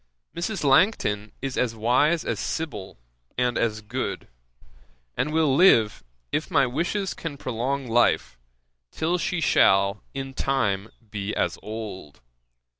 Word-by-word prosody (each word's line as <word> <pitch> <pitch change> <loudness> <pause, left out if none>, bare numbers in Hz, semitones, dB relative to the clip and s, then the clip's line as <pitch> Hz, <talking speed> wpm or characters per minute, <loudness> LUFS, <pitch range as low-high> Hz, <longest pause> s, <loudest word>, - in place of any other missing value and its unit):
Mrs. 175 +2 -3
Langton 135 - +2
is 135 -2 -2
as 120 -2 0
wise 130 +9 +2
as - - -2
Sibyl, 145 -13 -4 0.4
and 125 -1 +1
as 110 -2 0
good; 105 - -4 0.9
and 150 - -1
will 155 -3 +3
live, 115 - +5 0.3
if 155 +5 -1
my 140 -7 +4
wishes 175 +9 -1
can 155 -4 -6
prolong 130 +2 -2
life, 115 - +2 0.5
till 170 - -1
she 175 +1 -1
shall 100 -8 +3
in 135 0 -5
time 110 -8 0 0.2
be 105 -1 -3
as - - -1
old. 105 -8 -7
130 Hz, 125 wpm, -25 LUFS, 105-160 Hz, 0.9 s, live